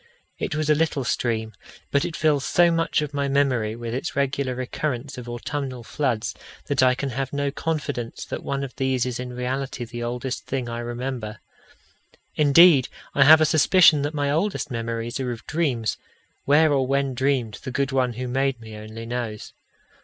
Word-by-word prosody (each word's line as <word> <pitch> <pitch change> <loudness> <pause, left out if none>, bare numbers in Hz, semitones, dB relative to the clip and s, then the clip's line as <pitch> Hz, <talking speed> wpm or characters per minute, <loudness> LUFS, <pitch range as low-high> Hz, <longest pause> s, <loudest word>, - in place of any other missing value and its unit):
It - - -2
was 155 0 -1
a 155 - +5
little 150 -3 0
stream, 110 -2 -1 0.4
but 140 - +2
it 160 - -4
fills 150 -3 +2
so 175 +2 +4
much 165 -2 +1
of 150 -1 -6
my 140 -1 0
memory 130 -6 +1
with 115 -1 -5
its 135 +7 -3
regular 135 -2 0
recurrence 130 +1 -3
of 120 -1 -8
autumnal 130 +1 -4
floods, 120 -4 -1 0.3
that 140 -2 +1
I 130 -1 +5
can 140 +2 -3
have 135 +2 -3
no 140 0 -1
confidence 145 -7 -3
that - - -5
one 140 0 -3
of 135 - -7
these 130 -2 +1
is 125 -1 -3
in 125 0 -5
reality 125 0 -3
the 120 +1 -7
oldest 125 +2 -4
thing 130 -2 -2
I 120 0 -4
remember. 120 -2 -4 1.0
Indeed, 150 -1 +6 0.3
I 140 - +5
have 160 +2 +9
a - - +6
suspicion 155 0 +5
that 145 +2 -2
my 145 -1 0
oldest 165 -1 -1
memories 115 +1 -3
are 130 -2 -2
of 115 - -8
dreams, 135 -9 -1 0.5
where 150 +2 +5
or 135 -2 +1
when 140 0 +1
dreamed, 130 -4 0
the 130 - -6
good 140 +2 -1
One 130 -2 +1
who 125 +2 -4
made 135 0 0
me 110 -1 -10
only 110 +2 -8
knows. 115 -3 -5
130 Hz, 185 wpm, -24 LUFS, 120-145 Hz, 1.0 s, have